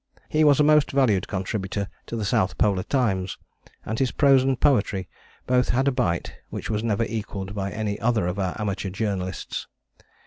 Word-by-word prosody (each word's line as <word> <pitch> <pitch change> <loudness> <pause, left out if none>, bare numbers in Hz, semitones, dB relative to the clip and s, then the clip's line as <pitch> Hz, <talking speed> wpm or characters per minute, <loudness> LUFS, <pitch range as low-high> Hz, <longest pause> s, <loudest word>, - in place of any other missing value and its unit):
He 155 0 +3
was 145 -2 +5
a - - +6
most 150 -1 +5
valued 120 -9 +2
contributor 100 0 -3 0.2
to - - -5
The 110 -3 -2
South 95 -1 +1
Polar 100 -3 +2
Times, 95 -7 0 0.5
and 110 +1 -3
his 130 - +2
prose 140 -3 +5
and 130 -1 0
poetry 100 -9 +2 0.4
both 125 0 +2
had 130 +3 +2
a - - +4
bite 85 -9 -1
which - - -5
was 105 0 -1
never 115 -1 +1
equalled 100 -3 -4
by 100 -1 -2
any 105 -1 -3
other 115 -5 +1
of 90 +3 -2
our 95 0 -2
amateur 100 -2 -2
journalists. 95 -2 -3
105 Hz, 180 wpm, -24 LUFS, 95-125 Hz, 0.5 s, a